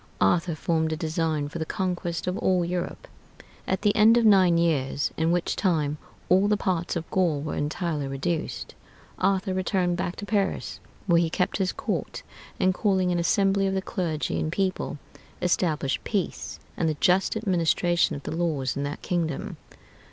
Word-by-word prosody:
Arthur 165 - +2
formed 160 0 0
a 155 - -2
design 155 -2 -1
for 160 +3 -6
the - - 0
conquest 175 -3 -2
of 180 - -1
all 180 -2 +2
Europe.... 175 0 -4 0.6
At 190 +1 -1
the 205 -1 +3
end 220 +2 +6
of 235 - +3
nine 190 -5 +6
years, 145 -4 +1
in 160 +1 +1
which 175 0 0
time 155 -6 0 0.3
all 190 +3 +4
the 210 0 +2
parts 180 -3 -1
of 165 -1 -3
Gaul 175 -6 +2
were 150 +2 -4
entirely 150 -1 -2
reduced, 145 +5 -3 0.5
Arthur 190 -1 +1
returned 185 -2 0
back 175 0 -2
to 205 - -6
Paris, 200 -2 -1 0.3
where 170 -4 +4
he 165 - +1
kept 180 +2 0
his 190 -2 0
court, - - -4 0.4
and 185 - +3
calling 190 -2 +1
an 175 - +1
assembly 195 +3 +2
of 190 - -1
the 190 - 0
clergy 165 -7 -2
and 155 - -1
people, 185 -4 -1 0.4
established 160 -6 0
peace 200 -5 -3 0.2
and 165 - 0
the 155 - -2
just 185 +4 +3
administration 175 -4 +2
of 140 - -8
the - - -4
laws 155 -6 -1
in 140 - -2
that 145 +1 -4
kingdom. 165 -5 -2
175 Hz, 175 wpm, -26 LUFS, 160-190 Hz, 0.6 s, end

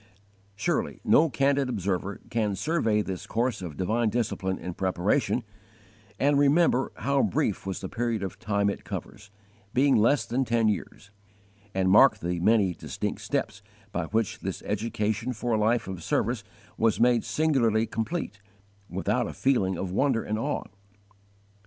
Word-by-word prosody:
Surely 100 - -1
no 160 +1 +5
candid 135 +1 +1
observer 100 -3 -2
can 110 -3 0
survey 110 - +1
this 95 -3 -6
course 120 0 -1
of 80 -5 -7
divine 110 +5 +1
discipline 100 -5 -1
and 90 -1 -6
preparation, 100 +7 0 0.8
and 140 0 +3
remember 145 -2 +3
how 140 +1 +1
brief 110 -11 0
was 95 - -3
the 95 - -4
period 115 -1 -2
of 95 - -5
time 100 0 0
it 100 - -2
covers, 105 0 -7 0.5
being 135 +2 +4
less 120 +7 +3
than 125 +3 0
ten 115 -2 +2
years, 100 0 -3 0.6
and 95 -1 +2
mark 110 +2 +7
the 90 -2 -3
many 100 -1 +3
distinct - - -4
steps - - -2 0.3
by - - -2
which 110 +4 -1
this - - -5
education 110 +2 -1
for 120 +1 -3
a 110 - +2
life 115 +1 +1
of 95 -3 -6
service - - 0 0.4
was 115 -2 +2
made 120 -1 +4
singularly 120 -8 +2
complete, 110 0 -3 0.5
without - - 0
a - - -6
feeling 100 -9 +1
of 90 0 -3
wonder 125 +2 +1
and 110 +1 -2
awe. 145 +5 -2
110 Hz, 150 wpm, -27 LUFS, 100-125 Hz, 0.8 s, mark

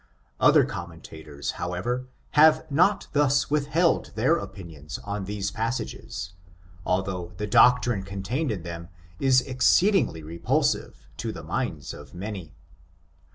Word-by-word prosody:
Other - - +6
commentators, 80 -4 -7
however, 120 +9 -2 0.2
have 155 +1 +5
not 185 +7 +3
thus 145 -1 +2
with 145 -1 +1
held 165 +3 +2
their 130 +9 +3
opinions 85 - -7
on 100 -1 -4
these 100 0 -3
passages, 110 -5 -4 0.5
although 90 -1 -1
the 105 - -2
doctrine 120 0 +4
contained 100 - -3
in 95 -6 -4
them 85 0 -7 0.3
is 130 -1 +4
exceedingly 130 - +2
repulsive 85 +2 -1
to - - -3
the - - -8
minds - - -3
of 70 -3 -12
many. 95 -3 -6
100 Hz, 120 wpm, -26 LUFS, 90-135 Hz, 0.5 s, Other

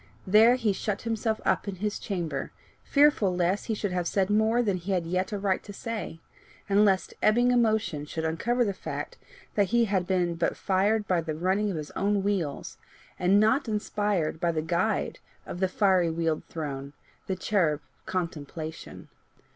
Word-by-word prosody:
There 220 +5 +6
he 225 -5 +1
shut 200 +1 -3
himself 225 -1 -1
up - - +1
in 200 - -3
his 210 +3 -3
chamber, 175 -6 -3 0.3
fearful 280 -10 +3
lest 180 +3 0
he 225 - 0
should 205 -2 -2
have 180 -1 -1
said 195 +2 +1
more 220 +3 +3
than 200 -4 0
he 185 +3 -3
had 175 -3 0
yet 185 +4 -1
a 205 - -2
right 195 -1 0
to 205 - -10
say, 215 -5 -5 0.5
and 205 +1 +4
lest 195 -3 +2
ebbing 240 +3 +4
emotion 220 -11 +1
should 160 +1 -4
uncover 235 +10 +1
the 200 - -1
fact - - -6 0.3
that 205 -2 +2
he 235 +3 +3
had 190 -4 0
been 180 -2 +1
but 165 0 -1
"fired 205 +2 +1
by 180 -2 +2
the 155 -1 -4
running 190 +6 +1
of 185 - -3
his 150 -1 -6
own 200 0 0
wheels," 185 -8 -2 0.4
and 190 +3 +4
not 220 +6 +3
inspired 205 -6 -1
by 170 -1 +1
the 155 -1 -2
guide 180 +6 0 0.3
of 175 - -6
"the 190 - +2
fiery 185 -3 +3
wheeled 165 -1 -1
throne, 140 -3 -5 0.3
the 190 - -1
cherub 180 -6 +1 0.3
Contemplation." 160 -2 -5
190 Hz, 180 wpm, -27 LUFS, 170-210 Hz, 0.5 s, There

